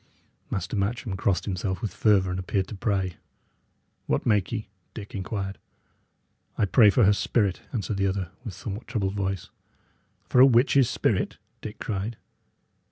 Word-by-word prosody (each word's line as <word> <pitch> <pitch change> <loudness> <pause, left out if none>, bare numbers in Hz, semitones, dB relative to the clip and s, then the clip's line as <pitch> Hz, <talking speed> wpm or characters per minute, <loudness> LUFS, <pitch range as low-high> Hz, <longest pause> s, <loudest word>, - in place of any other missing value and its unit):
Master 95 - -3
Matcham 105 +1 -1
crossed 95 -1 0
himself 95 -1 -2
with 105 - -4
fervour, 95 -4 +3
and 90 - -2
appeared 95 +1 -1
to - - -6
pray. 95 -4 -1 0.9
"What - - 0
make 105 -4 +2
ye?" 110 -3 -3 0.3
Dick 105 -2 -8
inquired. 95 0 -4 1.0
"I - - +3
pray 105 +2 +6
for 120 +4 +4
her 105 +1 +6
spirit," 100 -2 +1
answered 105 -3 -2
the 100 0 +2
other, 95 -3 -2
with 110 -8 -6
a - - -14
somewhat 105 +2 -6
troubled 100 -6 -1
voice. 95 -3 -3 0.7
"For 125 - +1
a - - +11
witch's 130 +1 +4
spirit?" - - 0 0.2
Dick 105 - -7
cried. 105 0 -3
100 Hz, 160 wpm, -26 LUFS, 95-110 Hz, 1.0 s, a